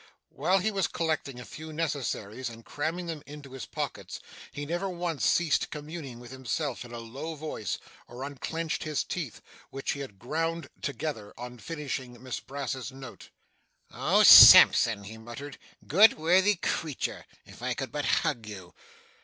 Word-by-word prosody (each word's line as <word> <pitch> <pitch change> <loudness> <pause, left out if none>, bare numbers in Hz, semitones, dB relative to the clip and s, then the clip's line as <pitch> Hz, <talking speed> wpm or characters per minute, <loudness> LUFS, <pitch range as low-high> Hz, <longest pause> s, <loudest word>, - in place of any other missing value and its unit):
While 190 - +1
he 205 +3 0
was 195 -4 0
collecting 155 -6 -2
a 125 - -9
few 155 +9 -9
necessaries 130 -7 -3
and 115 0 -13
cramming 165 +4 -3
them 165 -3 -5
into 145 -2 -11
his 130 -5 -7
pockets, - - -5 0.3
he 145 - -6
never 175 +5 -2
once 175 -4 -3
ceased 170 -4 +2
communing 150 -4 -7
with 120 0 -12
himself 130 +1 -3
in 120 - -12
a 120 - -6
low 135 +8 -7
voice, 150 -8 -4 0.3
or 125 +2 -8
unclenched 160 +4 -4
his 155 -2 -1
teeth, 160 - -5 0.3
which 135 0 -3
he 140 - -4
had 130 -8 -8
ground 165 +8 -3
together 140 -6 -4
on 125 0 -8
finishing 135 -5 -5
Miss 130 -2 -4
Brass's 135 -2 -5
note. 130 -2 -11 0.6
'Oh - - +3
Sampson!' 110 -3 +10
he 110 +3 -10
muttered, 120 +6 -9 0.3
'good 205 +8 +6
worthy 185 +6 +4
creature 160 -4 -3 0.2
if - - -14
I - - -2
could - - -5
but - - -3 0.2
hug 115 -2 -2
you! 95 -4 -9
140 Hz, 160 wpm, -28 LUFS, 120-160 Hz, 0.6 s, Sampson